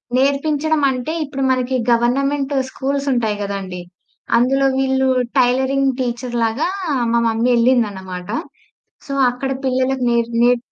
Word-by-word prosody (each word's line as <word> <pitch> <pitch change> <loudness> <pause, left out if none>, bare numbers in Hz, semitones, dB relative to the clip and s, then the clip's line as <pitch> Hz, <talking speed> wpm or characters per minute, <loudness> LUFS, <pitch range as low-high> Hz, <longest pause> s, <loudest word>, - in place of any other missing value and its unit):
నేర్పించడమంటే 280 0 +1
ఇప్పుడు 275 -1 -4
మనకి 255 0 0 0.2
గవర్నమెంట్ 275 +4 +1 0.2
స్కూల్సుంటాయి 265 -6 -1
కదండీ! 195 -3 -4 0.6
అందులో 270 +3 +2
వీళ్ళు 265 0 +1 0.3
టైలరింగ్ 265 +2 +2
టీచర్ 240 0 -3
లాగా 230 +9 0 0.4
మా 235 - +3
మమ్మీ 225 +2 +1
ఎళ్ళింది 240 -1 +3
అన్నమాట. 185 -1 -8 0.8
సో, 275 - -4 0.2
అక్కడ 265 +2 -4
పిల్లలకు 260 0 0
నేర్ 235 0 0
నే 245 0 +4
255 Hz, 110 wpm, -19 LUFS, 235-275 Hz, 0.8 s, నే